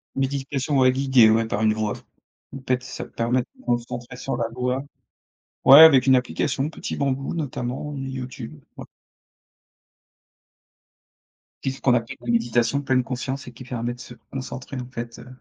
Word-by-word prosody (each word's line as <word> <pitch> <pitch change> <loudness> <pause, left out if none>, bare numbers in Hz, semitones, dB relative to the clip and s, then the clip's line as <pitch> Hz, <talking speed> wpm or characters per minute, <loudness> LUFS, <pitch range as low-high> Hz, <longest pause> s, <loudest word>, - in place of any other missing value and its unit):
Méditation 135 +1 -1
ouais 130 -1 +5
guidée, 130 -3 +5
ouais, 115 +1 +3
par 105 -1 -2
une 110 -1 +3
voix 110 -1 -2
off. - - -8 0.5
En - - -5
fait, 125 0 +1
ça 125 - -6
te - - -16
permet 120 +2 0
de 120 - -6
te - - -19
concentrer 120 +1 -3
sur 135 - -3
la 115 - -1
voix. 125 +2 -1 0.8
Ouais, 140 +3 +10
avec 140 -5 +8
une 130 - +6
application, 135 +3 -1
Petit - - -6
Bambou 135 +1 -1
notamment, 145 -1 -4
YouTube, 135 +1 -7
ouais. - - -8 2.8
Qui - - 0
est - - -1
ce 135 - -13
qu'on 130 - +4
appelle 115 -1 -1
de 120 - -16
la 120 - 0
méditation 120 +3 +1
pleine 130 -2 +1
conscience 130 +1 -4
et 125 - -9
qui 130 - -11
permet 120 -1 -3
de 125 - -15
se 120 0 -10 0.2
concentrer, 130 0 -6
en 125 - -8
fait, 120 -2 -7
heu, 125 - -12
130 Hz, 185 wpm, -23 LUFS, 120-135 Hz, 2.8 s, Ouais